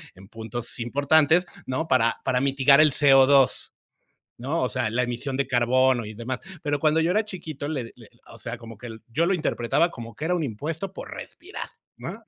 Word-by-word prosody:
en 95 Hz, +1 st, -15 dB
puntos 115 Hz, +2 st, -6 dB
importantes, 145 Hz, +7 st, +3 dB, 0.2 s
¿no? 160 Hz, +5 st, -2 dB
Para 115 Hz, -4 st, +2 dB
para 125 Hz, -1 st, +1 dB
mitigar 140 Hz, +1 st, +5 dB
el 155 Hz, -1 st, +5 dB, 0.4 s
CO2, 135 Hz, -2 st, +3 dB, 0.7 s
¿no? 140 Hz, +8 st, -2 dB
O 130 Hz, -, +1 dB
sea, 110 Hz, -, -2 dB
la 120 Hz, +3 st, 0 dB
emisión 125 Hz, +3 st, -4 dB
de 140 Hz, -, +1 dB
carbono 125 Hz, 0 st, +2 dB
y 105 Hz, -, -7 dB
demás. 120 Hz, +4 st, -5 dB, 0.2 s
Pero 145 Hz, -2 st, -1 dB
cuando 155 Hz, +2 st, +2 dB
yo 165 Hz, +2 st, +1 dB
era 215 Hz, +4 st, +2 dB
chiquito, 160 Hz, -8 st, -7 dB
le 130 Hz, -7 st, -4 dB
le 115 Hz, -3 st, -16 dB, 0.2 s
o 115 Hz, -, -13 dB
sea, 115 Hz, +2 st, -6 dB
como 115 Hz, -1 st, -11 dB
que 120 Hz, -, -9 dB
el 110 Hz, 0 st, -10 dB
yo 150 Hz, +9 st, 0 dB
lo 195 Hz, -, +2 dB
interpretaba 165 Hz, 0 st, +1 dB
como 115 Hz, -6 st, -9 dB
que 150 Hz, -, -5 dB
era 180 Hz, -, +1 dB
un 170 Hz, -3 st, -1 dB
impuesto 155 Hz, -, -4 dB
por -, -, -9 dB
respirar, 390 Hz, +4 st, -8 dB, 0.3 s
¿no? -, -, -8 dB
130 Hz, 200 wpm, -25 LUFS, 120-155 Hz, 0.7 s, mitigar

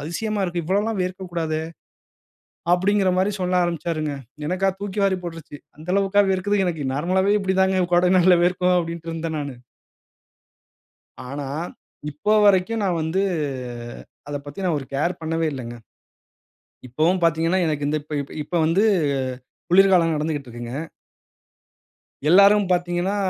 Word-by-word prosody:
அதிசயமா 205 Hz, +7 st, -3 dB
இருக்கு. 175 Hz, -2 st, -2 dB
இவ்வளோல்லாம் 200 Hz, +4 st, 0 dB
வேர்க்கக்கூடாதே!" 175 Hz, -4 st, -3 dB, 1.1 s
அப்படிங்கிற 190 Hz, 0 st, +2 dB
மாரி 195 Hz, +2 st, +1 dB
சொல்ல 180 Hz, 0 st, 0 dB
ஆரம்பிச்சாருங்க. 160 Hz, -3 st, -2 dB, 0.3 s
எனக்கா 190 Hz, +2 st, +1 dB
தூக்கி 205 Hz, 0 st, -3 dB
வாரி 190 Hz, -1 st, +1 dB
போட்டுருச்சு. 165 Hz, -3 st, -8 dB, 0.2 s
"அந்த 155 Hz, +3 st, -12 dB
அளவுக்கா 200 Hz, +1 st, +3 dB
வேர்க்குது! 205 Hz, +2 st, 0 dB
எனக்கு 160 Hz, -5 st, -2 dB
நார்மலாவே 190 Hz, +7 st, +2 dB
இப்படி 190 Hz, -1 st, -1 dB
தாங்க 190 Hz, -1 st, +2 dB
கோடை 180 Hz, +1 st, +4 dB
நாள்ல 180 Hz, 0 st, +5 dB
வேர்க்கும்" 180 Hz, 0 st, +2 dB
அப்படின்டு 170 Hz, -1 st, -5 dB
இருந்தேன் 165 Hz, -1 st, -4 dB
நானு. 140 Hz, -3 st, -6 dB, 1.7 s
ஆனா, 140 Hz, 0 st, -5 dB, 0.6 s
இப்போ 150 Hz, +9 st, -2 dB
வரைக்கும் 205 Hz, +3 st, +3 dB
நான் 180 Hz, -3 st, 0 dB
வந்து 160 Hz, +5 st, 0 dB, 1.1 s
அத 145 Hz, -, -4 dB
பத்தி 145 Hz, +7 st, -7 dB
நான் 170 Hz, -4 st, +1 dB
ஒரு 135 Hz, -, -9 dB
கேர் 170 Hz, +6 st, -1 dB
பண்ணவே 165 Hz, +1 st, -1 dB
இல்லங்க. 120 Hz, -3 st, -6 dB, 1.1 s
இப்பவும் 160 Hz, +9 st, +1 dB
பார்த்தீங்கன்னா, 165 Hz, +2 st, +2 dB
எனக்கு 150 Hz, -2 st, -1 dB
இந்த 155 Hz, -, 0 dB
இப்ப 150 Hz, 0 st, -6 dB
இப் 140 Hz, -, -10 dB
இப்ப 175 Hz, -, -6 dB
வந்து 170 Hz, +6 st, +2 dB, 0.9 s
குளிர்காலம் 180 Hz, -2 st, +5 dB
நடந்துக்கிட்டு 150 Hz, -4 st, -3 dB
இருக்குங்க. 120 Hz, 0 st, -7 dB, 1.6 s
எல்லாரும் 200 Hz, +3 st, +6 dB
பார்த்தீங்கன்னா, 175 Hz, +2 st, 0 dB
175 Hz, 130 wpm, -22 LUFS, 155-190 Hz, 1.7 s, எல்லாரும்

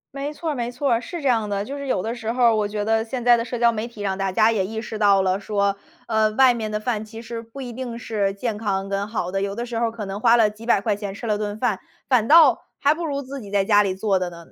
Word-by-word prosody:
没 280 Hz, +2 st, -3 dB
错 320 Hz, +1 st, -4 dB
儿 -, -, -3 dB
没 240 Hz, -1 st, -3 dB
错 255 Hz, 0 st, 0 dB
儿， 230 Hz, -, +1 dB
是 340 Hz, +4 st, -6 dB
这 280 Hz, -, -1 dB
样 225 Hz, -4 st, +1 dB
的， 200 Hz, 0 st, -2 dB
就 280 Hz, +4 st, -6 dB
是 280 Hz, -1 st, -6 dB
有 220 Hz, -, 0 dB
的 225 Hz, +4 st, -3 dB
时 230 Hz, -2 st, -3 dB
候 250 Hz, 0 st, 0 dB
儿 230 Hz, -2 st, +5 dB
我 215 Hz, -1 st, +1 dB
觉 210 Hz, 0 st, -3 dB
得 225 Hz, 0 st, +2 dB
现 245 Hz, +2 st, -5 dB
在 240 Hz, -1 st, +7 dB
的 230 Hz, -, -1 dB
社 240 Hz, 0 st, -5 dB
交 235 Hz, -1 st, +5 dB
媒 220 Hz, +1 st, -3 dB
体 235 Hz, -3 st, -12 dB
让 195 Hz, -2 st, -1 dB
大 195 Hz, -1 st, -1 dB
家 215 Hz, +3 st, +4 dB
也 205 Hz, -4 st, +1 dB
意 220 Hz, +3 st, -5 dB
识 220 Hz, -1 st, -6 dB
到 200 Hz, -2 st, +4 dB
了 185 Hz, 0 st, +1 dB
说， 200 Hz, -1 st, 0 dB, 0.3 s
呃， 220 Hz, -1 st, +2 dB
外 260 Hz, +2 st, +5 dB
面 220 Hz, -2 st, -4 dB
的 210 Hz, -, -1 dB
饭 215 Hz, -1 st, -2 dB
其 225 Hz, +1 st, -10 dB
实 230 Hz, 0 st, -6 dB
不 230 Hz, +4 st, -12 dB
一 245 Hz, -3 st, -6 dB
定 240 Hz, -2 st, -6 dB
是 200 Hz, -4 st, -1 dB
健 215 Hz, +1 st, -3 dB
康 195 Hz, -3 st, -2 dB
跟 200 Hz, 0 st, -2 dB
好 195 Hz, -5 st, -2 dB
的。 195 Hz, +1 st, -2 dB
有 200 Hz, 0 st, -2 dB
的 235 Hz, +3 st, -4 dB
时 235 Hz, -1 st, -5 dB
候 230 Hz, 0 st, 0 dB
可 225 Hz, -2 st, -6 dB
能 195 Hz, +2 st, -5 dB
花 235 Hz, +1 st, +5 dB
了 215 Hz, -2 st, +4 dB
几 215 Hz, +2 st, -12 dB
百 235 Hz, -, +3 dB
块 205 Hz, 0 st, 0 dB
钱 205 Hz, -1 st, -6 dB
吃 215 Hz, +4 st, -7 dB
了 210 Hz, -1 st, +1 dB
顿 210 Hz, 0 st, -4 dB
饭， 220 Hz, -7 st, 0 dB, 0.3 s
反 235 Hz, -4 st, +2 dB
倒 305 Hz, -6 st, +7 dB, 0.2 s
还 290 Hz, +2 st, +4 dB
不 335 Hz, +1 st, -5 dB
如 280 Hz, -2 st, -2 dB
自 275 Hz, 0 st, -7 dB
己 200 Hz, -2 st, -10 dB
在 200 Hz, -1 st, +2 dB
家 205 Hz, 0 st, +5 dB
里 190 Hz, -2 st, -1 dB
做 195 Hz, 0 st, +1 dB
的 180 Hz, -1 st, -2 dB
呢， 170 Hz, -1 st, -12 dB
220 Hz, 335 characters per minute, -23 LUFS, 205-240 Hz, 0.3 s, 在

